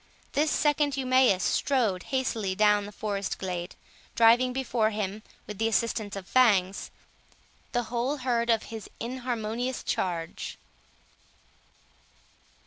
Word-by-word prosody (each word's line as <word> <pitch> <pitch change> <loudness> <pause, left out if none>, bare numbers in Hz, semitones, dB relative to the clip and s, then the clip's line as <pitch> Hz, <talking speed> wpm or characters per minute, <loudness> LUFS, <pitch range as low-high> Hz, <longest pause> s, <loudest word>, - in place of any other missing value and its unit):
This 300 +2 +2
second 295 -2 +1
Eumaeus 255 -7 +3
strode 230 -10 +1
hastily 225 -7 -1
down 210 0 +3
the - - -9
forest 200 -2 -3
glade, 180 -1 -4 0.4
driving 235 +2 +5
before 245 -4 0
him, 210 -1 -3 0.2
with 210 -1 -8
the 225 - +2
assistance 220 -2 0
of 195 -2 -7
Fangs, 200 -7 +3 0.8
the 245 -1 0
whole 245 +5 -2
herd 240 -3 0
of 225 -1 +3
his 220 -3 -7
inharmonious 245 0 -3
charge. 170 -3 -3
225 Hz, 115 wpm, -28 LUFS, 205-255 Hz, 0.8 s, driving